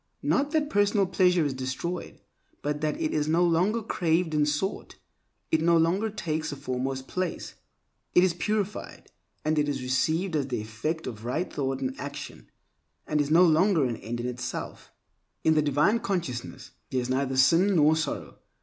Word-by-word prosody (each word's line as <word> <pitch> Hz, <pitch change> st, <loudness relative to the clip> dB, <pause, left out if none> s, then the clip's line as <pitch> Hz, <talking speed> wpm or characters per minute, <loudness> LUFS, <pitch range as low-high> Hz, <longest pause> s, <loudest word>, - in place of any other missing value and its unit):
Not 285 Hz, +1 st, +2 dB
that 300 Hz, -1 st, 0 dB
personal 205 Hz, 0 st, +3 dB
pleasure 180 Hz, -3 st, +3 dB
is 140 Hz, -, -1 dB
destroyed, 130 Hz, +7 st, -5 dB, 0.4 s
but 150 Hz, 0 st, -2 dB
that 155 Hz, -, -1 dB
it 320 Hz, -2 st, -1 dB
is 150 Hz, -1 st, 0 dB
no 165 Hz, +3 st, +3 dB
longer 180 Hz, +7 st, +2 dB
craved 170 Hz, -4 st, 0 dB
and 150 Hz, -1 st, +2 dB
sought, 150 Hz, +7 st, -3 dB, 0.6 s
it 160 Hz, -, +3 dB
no 170 Hz, +1 st, +4 dB
longer 180 Hz, +7 st, +2 dB
takes 160 Hz, -7 st, -3 dB
a -, -, -4 dB
foremost 130 Hz, -1 st, -3 dB
place. 185 Hz, -2 st, -3 dB, 0.6 s
It 180 Hz, -, +7 dB
is 185 Hz, -2 st, +3 dB
purified, 210 Hz, +3 st, -3 dB, 0.3 s
and 155 Hz, 0 st, +2 dB
it 145 Hz, 0 st, +1 dB
is 135 Hz, -2 st, -3 dB
received 160 Hz, +7 st, 0 dB
as 140 Hz, -3 st, 0 dB
the 125 Hz, -, -2 dB
effect 115 Hz, +10 st, -4 dB
of 110 Hz, -2 st, -7 dB
right 140 Hz, +9 st, -2 dB
thought 135 Hz, -1 st, -2 dB
and 130 Hz, -1 st, -1 dB
action, 145 Hz, 0 st, -8 dB, 0.6 s
and 150 Hz, -1 st, +1 dB
is 145 Hz, -, -2 dB
no 165 Hz, +3 st, +6 dB
longer 165 Hz, -1 st, +4 dB
an 120 Hz, -3 st, -2 dB
end 120 Hz, +2 st, -5 dB
in 120 Hz, -, -3 dB
itself. 125 Hz, -1 st, -5 dB, 0.5 s
In 160 Hz, -, +4 dB
divine 150 Hz, -, +3 dB
consciousness 170 Hz, -, -4 dB, 0.2 s
there 130 Hz, -, 0 dB
is 125 Hz, +1 st, -3 dB
neither 135 Hz, 0 st, 0 dB
sin 175 Hz, +9 st, +5 dB
nor 155 Hz, -1 st, +5 dB
sorrow. 155 Hz, -2 st, -4 dB
155 Hz, 175 wpm, -27 LUFS, 135-180 Hz, 0.6 s, It